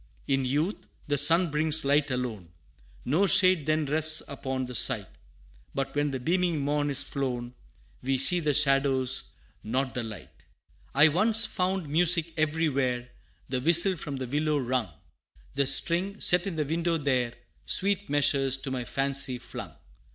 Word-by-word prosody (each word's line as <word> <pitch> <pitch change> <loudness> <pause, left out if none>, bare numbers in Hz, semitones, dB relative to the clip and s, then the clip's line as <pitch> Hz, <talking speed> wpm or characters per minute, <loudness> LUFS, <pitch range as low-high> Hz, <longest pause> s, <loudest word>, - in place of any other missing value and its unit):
In 135 -1 0
youth, 150 +10 -3 0.2
the 145 0 -1
sun 165 +3 +6
brings 155 0 +1
light 145 +1 +1
alone 120 -9 -5 0.6
No 165 +10 +1
shade 185 -6 +4
then 155 0 0
rests 155 +2 +3
upon 130 -2 -5
the 125 - -9
sight 110 - +1 0.7
But 135 -1 -3
when 145 0 0
the 135 -2 -5
beaming 170 +3 -1
morn 145 +1 -1
is 145 0 +1
flown, 125 -4 -5 0.5
We 135 +1 -1
see 175 +7 +2
the 150 -4 -1
shadows 135 -2 +1 0.3
not 130 +3 -3
the 125 - -3
light 110 -2 -11 0.5
I 150 +3 +6
once 215 +7 +3
found 185 -4 -3
music 165 +2 +2
every 155 +1 0
where 125 -4 -2 0.4
The 130 -1 -3
whistle 170 +6 +4
from 145 -3 -7
the 130 -1 -5
willow 150 +4 -1
wrung 125 -5 -2 0.6
The 140 -1 0
string, 180 +8 +2
set 180 +2 +3
in 185 - -5
the 155 -1 -2
window, 165 +2 -1
there, 130 -5 -2 0.3
Sweet 200 +1 0
measures 135 -2 +1
to 135 0 -7
my 130 -2 -4
fancy 135 -1 0
flung. 120 - -9
145 Hz, 160 wpm, -26 LUFS, 130-165 Hz, 0.7 s, sun